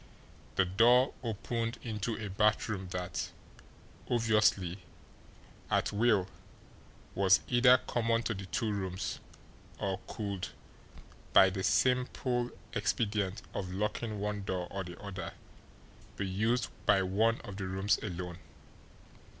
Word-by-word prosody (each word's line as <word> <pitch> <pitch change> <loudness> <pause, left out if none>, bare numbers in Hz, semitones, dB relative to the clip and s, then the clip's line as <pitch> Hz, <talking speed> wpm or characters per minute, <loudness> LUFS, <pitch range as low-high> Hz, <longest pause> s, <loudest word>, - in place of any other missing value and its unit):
The 95 - +4
door 120 +8 +5
opened 115 0 -2
into 110 -1 -2
a 110 - -4
bathroom 105 -1 +1
that, 90 -1 -3 0.8
obviously, 105 -6 +2 0.9
at - - +1
will, 105 -3 +3 0.9
was 95 -1 +5
either 125 +1 +6
common 115 -1 0
to 115 - -1
the 95 -2 -7
two 110 +2 -1
rooms 95 -2 -3 0.6
or 95 -1 -2
could, 100 -4 -4 0.9
by 95 -1 +8
the 95 0 -3
simple 125 +2 +1 0.2
expedient 105 -3 0
of 90 -2 -4
locking 105 +2 -2
one 105 0 -2
door 90 -2 -3
or 95 -1 -3
the 90 -1 -9
other, 100 -2 -6 0.8
be 100 - -1
used 110 +6 +1 0.2
by 100 -2 +5
one 110 +5 +2
of 100 -1 -8
the 95 -2 -3
rooms 95 +2 +1
alone. 90 -3 -5
105 Hz, 120 wpm, -32 LUFS, 95-115 Hz, 0.9 s, by